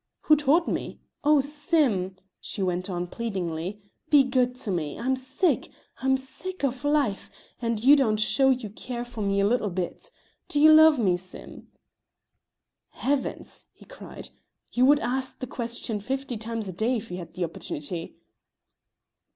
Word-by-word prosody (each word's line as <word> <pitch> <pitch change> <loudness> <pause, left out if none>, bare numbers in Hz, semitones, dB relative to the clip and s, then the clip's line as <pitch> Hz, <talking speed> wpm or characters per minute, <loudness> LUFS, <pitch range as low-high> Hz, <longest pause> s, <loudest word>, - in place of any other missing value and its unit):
"Who 305 - +5
taught 300 +4 +3
me? - - -3 0.2
Oh, 295 -1 +5
Sim," 285 - +1 0.2
she 200 - -4
went 180 +1 -1
on, 175 -1 -2
pleadingly, 190 -2 -4 0.3
"be 290 -3 +7
good 250 -1 +1
to 250 -5 -3
me. 155 -5 -2
I'm 260 +3 0
sick, 260 +8 0 0.3
I'm 265 0 +2
sick 315 +7 -7
of 265 0 -1
life, 290 -9 +1 0.3
and 230 -2 -1
you 280 +3 +8
don't 220 -7 +2
show 265 +5 +3
you 250 -6 0
care 240 +3 -5
for 240 -2 -7
me 200 -1 +1
a - - +3
little 220 -1 +1
bit. 185 - -4 0.4
Do 290 - -1
you 310 +1 +8
love 315 -1 +8
me, 190 -7 +2
Sim?" 185 +1 -10 1.2
"Heavens!" 275 0 -3
he - - -18
cried, - - -10 0.4
"you 250 +1 +4
would 290 +1 +6
ask 260 +1 -2
the 255 - -5
question 235 -3 -4
fifty 265 +3 -3
times 225 -1 -4
a 185 - -5
day 225 +7 0
if 225 -1 -8
you 180 - -4
had 170 - -9
the 180 - -3
opportunity." 165 0 -5
245 Hz, 160 wpm, -26 LUFS, 200-275 Hz, 1.2 s, you